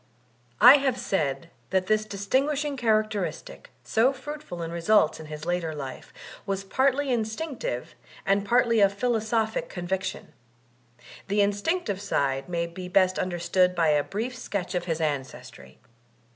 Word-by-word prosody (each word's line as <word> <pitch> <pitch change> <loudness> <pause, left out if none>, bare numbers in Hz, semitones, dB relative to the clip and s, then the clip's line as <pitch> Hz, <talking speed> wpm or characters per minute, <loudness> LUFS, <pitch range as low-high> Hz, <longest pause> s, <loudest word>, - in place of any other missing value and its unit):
I 250 +5 +10
have 270 -3 0
said 155 - -2 0.2
that 190 -1 +1
this 215 +2 +1
distinguishing 275 +9 -1
characteristic, 215 - -1
so 230 +4 +3
fruitful 270 - -7
in 165 - -5
results 170 -1 +2
in 160 - -9
his 150 0 -7
later 175 -2 -1
life, 135 -3 -7 0.4
was 195 0 -2
partly 265 +6 +1
instinctive 250 - -3 0.3
and 195 +1 +2
partly 230 +1 +3
a 200 -1 +6
philosophic 220 +1 -1
conviction. 185 +1 -4 0.9
The 205 +1 +2
instinctive 205 - 0
side 140 -7 -1
may 170 -1 -1
be 180 +2 -8
best 185 0 +3
understood 180 +1 +1
by 165 -2 +3
a 150 -1 +3
brief 230 - -4
sketch 200 -7 -4
of 175 -1 -2
his 165 -2 -2
ancestry. 135 -5 -5
200 Hz, 135 wpm, -26 LUFS, 170-235 Hz, 0.9 s, I